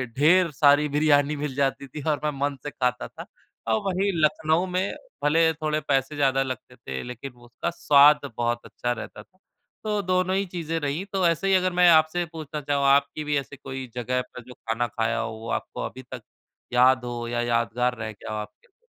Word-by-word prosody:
ढेर 170 +5 +4
सारी 145 +1 +4
बिरयानी 150 0 +3
मिल 145 -1 -4
जाती 140 0 -1
थी 145 +3 -8
और 150 - +1
मैं 150 - +1
मन 140 0 0
से 145 - -4
खाता 125 -2 -1
था - - -10 0.5
और 110 - +2
वहीं 195 +1 +1
लखनऊ 160 +3 +2
में 185 +2 -1 0.3
भले 160 +2 +4
थोड़े 155 -1 -1
पैसे 135 +1 0
ज़्यादा 135 -2 +2
लगते 130 -1 -7
थे 65 - -6
लेकिन 125 +2 -7
उसका 120 +6 -6
स्वाद 150 -2 +6 0.2
बहुत 120 0 0
अच्छा 120 - -3
रहता 120 - -6
था। 185 - -35 0.5
तो 210 -1 -1
दोनों 185 0 +1
ही 195 +1 0
चीज़ें 165 -3 -3
रही 145 +4 -2
तो 190 -2 +1
ऐसे 170 +3 0
ही 195 - +3
अगर 185 -1 +1
मैं 180 0 +5
आपसे 160 +2 +4
पूछना 155 -2 -6
चाहूँ, 140 -1 0
आपकी 140 +2 +3
भी 150 -1 0
ऐसी 140 +1 -5
कोई 130 -1 -7
जगह 125 +1 -1
पर 125 0 -11
जो 125 - -10
खाना 115 0 -2
खाया 115 -1 -1
हो, - - -3
वो 110 +1 -8
आपको - - -4
अभी 130 - -7
तक 125 - -6 0.5
याद 125 +1 +4
हो 120 -1 -4
या 120 0 -1
यादगार 120 +1 0
रह 110 -1 -5
गया 110 - -9
हो 110 - -3
आपके 105 - -10
लिए? 480 0 -43
145 Hz, 205 wpm, -25 LUFS, 125-160 Hz, 0.5 s, स्वाद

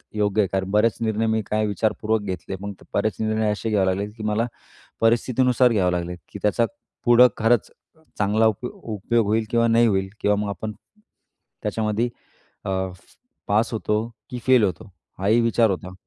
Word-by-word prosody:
योग्य 105 0 +2
आहे 100 - +1
कारण 95 0 -1
बरेच 105 +1 +3
निर्णय 110 0 0
मी 110 0 +1
काय 110 0 0
विचारपूर्वक 110 +1 0
घेतले 95 -1 -5
मग 100 0 -5 0.2
बरेच 105 +1 0
निर्णय 110 0 +1
असे 105 +2 -3
घ्यावे 105 -3 +2
लागले, 95 +2 0
की 110 0 -10
मला 105 +2 +1 0.6
परिस्थितीनुसार 125 +2 +3
घ्यावे 95 -5 +2
लागले, 90 0 -3
की 100 - -8
त्याचा 115 +3 +2 0.4
पुढं 120 +1 +7
खरंच 115 0 +2 0.5
चांगला 105 +2 +3
उप 110 +3 -2
उपयोग 110 +1 -1
होईल 110 +1 +1
किंवा 115 0 +2
नाही 115 +1 +4
होईल 95 -2 0
किंवा 105 0 +3
मग 105 -1 -2
आपण 110 +2 -4 0.9
त्याच्यामध्ये 110 +2 0 0.6
अ, 95 - -2 0.8
पास 110 +4 +2
होतो, 105 -1 0 0.3
की 125 -2 -5
फेल 130 -3 +6
होतो, 105 +2 -2 0.3
हा 95 - -1
ही 115 +3 +4
विचार 115 -1 +3
होता. 95 0 -5
110 Hz, 170 wpm, -23 LUFS, 100-115 Hz, 0.9 s, पुढं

